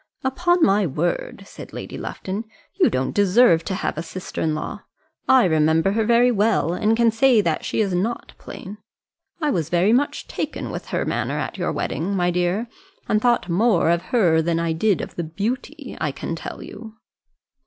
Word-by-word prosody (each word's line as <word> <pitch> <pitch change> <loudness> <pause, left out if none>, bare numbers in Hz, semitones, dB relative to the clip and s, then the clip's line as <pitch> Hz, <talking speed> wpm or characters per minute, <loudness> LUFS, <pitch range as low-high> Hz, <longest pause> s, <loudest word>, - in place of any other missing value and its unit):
"Upon 350 +6 +2
my 195 -1 +3
word," 175 - -2
said - - -11
Lady - - -7
Lufton, 195 +4 -5 0.3
"you - - +3
don't 130 +1 -1
deserve 200 -3 +4
to 190 - -2
have 160 - -3
a - - -1
sister 180 +2 -6
in 155 -1 0
law. 155 - -5 0.5
I 260 -1 +6
remember 160 +2 +3
her 220 +2 +1
very 240 +2 +4
well, 205 - +1
and 215 +4 +1
can 235 -1 +4
say 235 +1 +4
that 165 -5 -1
she - - -1
is 195 -3 0
not 205 +7 -2
plain. 205 +3 -9 0.6
I 300 -2 +1
was 165 -5 -1
very 180 +5 +3
much 280 +4 0
taken - - -4
with - - -6
her - - -2
manner - - -2
at - - -4
your - - -1
wedding, 195 +5 -2
my 180 -1 +1
dear; 180 +6 0 0.4
and 215 - +1
thought 240 -6 +2
more 180 -1 +2
of 170 0 +1
her 175 -10 +3
than 165 0 0
I 165 -1 0
did 195 +4 +1
of - - -7
the 175 - -1
beauty, 250 - -4
I 150 - 0
can 165 - -5
tell - - -7
you." 220 0 -10
195 Hz, 190 wpm, -22 LUFS, 170-235 Hz, 0.6 s, I